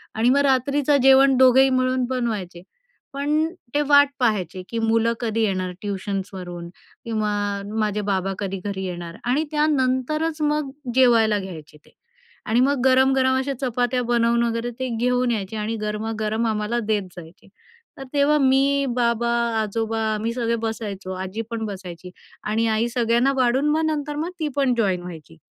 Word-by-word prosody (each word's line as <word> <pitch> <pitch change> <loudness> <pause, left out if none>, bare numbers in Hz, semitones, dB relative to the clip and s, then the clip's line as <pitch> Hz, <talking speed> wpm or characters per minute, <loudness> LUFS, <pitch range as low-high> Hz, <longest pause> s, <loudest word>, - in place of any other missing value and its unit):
आणि 225 +3 +2
मग 265 - +4
रात्रीचं 280 +2 +2
जेवण 270 0 +6
दोघंही 260 +1 +6
मिळून 255 0 +1
बनवायचे, 215 -9 -3 0.5
पण 295 +3 0 0.3
ते 295 - +2
वाट 285 0 +6
पाहायचे 195 -7 0
की, 230 - -3
मुलं 225 +1 +2
कधी 225 -2 -1
येणार 185 -3 -1
ट्युशन्सवरून 190 -3 -5 0.4
किंवा 215 -2 -1 0.5
माझे 210 -1 0
बाबा 195 0 0
कधी 195 -2 -3
घरी 195 -2 -3
येणार. 175 -2 -6
आणि 260 +6 +1
त्यानंतरच 300 +1 0
मग 300 -1 0 0.3
जेवायला 230 -5 +4
घ्यायचे 160 -6 -9
ते, - - -22 0.5
आणि 225 +3 +1
मग 270 0 +2
गरम-गरम 260 0 +4
अशा 270 +1 -1
चपात्या 250 0 0
बनवून 235 0 +2
वगैरे 230 +1 -2
ते 260 0 -2
घेऊन 250 +1 +1
यायचे 210 -1 -3
आणि 215 +2 -2
गरमागरम 215 +1 -2
आम्हाला 215 +2 -1
देत 210 -2 +1
जायचे. 170 0 -13 0.5
तर 270 - -7
तेव्हा 290 +1 +3
मी, 275 0 +3
बाबा, 235 -1 +1 0.3
आजोबा, 225 +1 -2
आम्ही 220 +2 -2
सगळे 235 -1 -1
बसायचो, 205 -4 -5
आजी 190 +4 -5
पण 225 -1 -3
बसायची. 185 -3 -8 0.3
आणि 225 +2 0
आई 230 +2 +1
सगळ्यांना 240 +3 +2
वाढून, 260 +3 +2
मग 315 +2 +1
नंतर 295 -2 -2
मग 315 +4 -2
ती 310 - -1
पण 275 -3 +2
जॉइन 190 -6 +1
व्हायची. 165 -2 -10
235 Hz, 155 wpm, -22 LUFS, 210-265 Hz, 0.5 s, जेवण